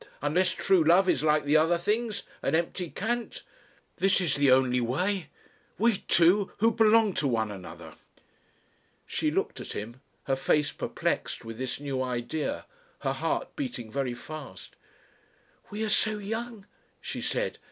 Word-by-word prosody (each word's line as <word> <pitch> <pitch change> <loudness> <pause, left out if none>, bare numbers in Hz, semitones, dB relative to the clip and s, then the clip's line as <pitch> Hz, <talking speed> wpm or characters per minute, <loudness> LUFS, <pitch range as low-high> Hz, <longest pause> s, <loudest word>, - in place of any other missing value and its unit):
Unless 175 +5 +2
True 190 -4 +3
Love 175 +4 +5
is - - +2
like 150 -1 +2
the 150 +2 +4
other 165 +2 +3
things 215 +5 -1 0.2
an - - +1
empty 170 +1 -1
cant. 235 +3 -3 0.5
This 195 +1 +3
is 170 -6 +1
the 145 -1 +3
only 130 -1 +4
way. 175 - -1 0.5
We 230 -2 +3
two 185 +4 +4
who 225 +2 +4
belong 225 -2 +4
to 145 - +1
one 110 -4 0
another." 95 -3 -9 1.1
She - - -1
looked - - -2
at - - -6
him, 115 +5 -7 0.2
her 135 - 0
face 145 +2 +1
perplexed - - -3
with 115 0 -8
this 130 0 -3
new 140 -2 -3
idea, 125 +4 -3 0.4
her - - 0
heart - - -2
beating 245 - -5
very 130 -2 -2
fast. 140 - -9 0.9
"We 210 +2 -4
are - - 0
so 215 0 +2
young," 225 +1 -5 0.3
she - - -5
said. - - -1
165 Hz, 150 wpm, -28 LUFS, 130-205 Hz, 1.1 s, Love